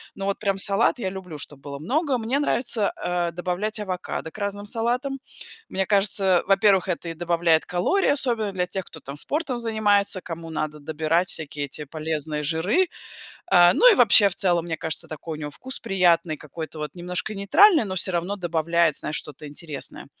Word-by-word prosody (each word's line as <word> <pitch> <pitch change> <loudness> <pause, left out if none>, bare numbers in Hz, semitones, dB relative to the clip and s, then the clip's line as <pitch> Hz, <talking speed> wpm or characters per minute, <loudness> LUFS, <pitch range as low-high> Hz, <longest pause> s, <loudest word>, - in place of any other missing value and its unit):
Но 195 - -5
вот 200 0 -1
прям 195 -2 0
салат 200 +8 +2
я 190 - -2
люблю, 185 -5 -8
чтоб 145 -1 -6
было 140 0 -8
много. 270 - 0
Мне 240 +4 -1
нравится, 240 -7 0
э, 175 -1 -1
добавлять 180 +5 -3
авокадо 185 -4 -4
к - - -14
разным 205 0 -3
салатам. 245 +6 -1 0.5
Мне 190 0 -1
кажется, 195 -2 +2
во-первых, 195 -1 +4
это 170 -1 -3
и - - -4
добавляет 170 -1 +1
калории, 185 - +1
особенно 235 -7 +1
для 180 -2 -1
тех, 190 +1 -4
кто 160 - -12
там 140 -1 -9
спортом 275 - -3
занимается, 210 -4 +2
кому 165 -1 -7
надо 155 -1 -4
добирать 160 +4 0
всякие 145 -2 0
эти 145 +2 -6
полезные 155 0 -3
жиры. 175 - +1 0.7
Э, 175 0 +7
ну - - +7
и - - +4
вообще, 210 -3 +7
в - - -3
целом, 175 -4 +1
мне 165 -2 -3
кажется, 160 -1 -2
такой 160 +1 -7
у - - -9
него 150 -1 -5
вкус 260 - -5
приятный, 175 -6 +2
какой-то 155 +1 -8
вот 150 -2 -5
немножко 180 +4 -3
нейтральный, 310 - +5
но 190 -2 -4
всё 185 +1 +1
равно 175 +4 -2
добавляет, 170 -3 +1
знаешь, 150 - -4
что-то 150 0 -9
интересное. 150 0 -7
180 Hz, 185 wpm, -24 LUFS, 160-210 Hz, 0.7 s, Э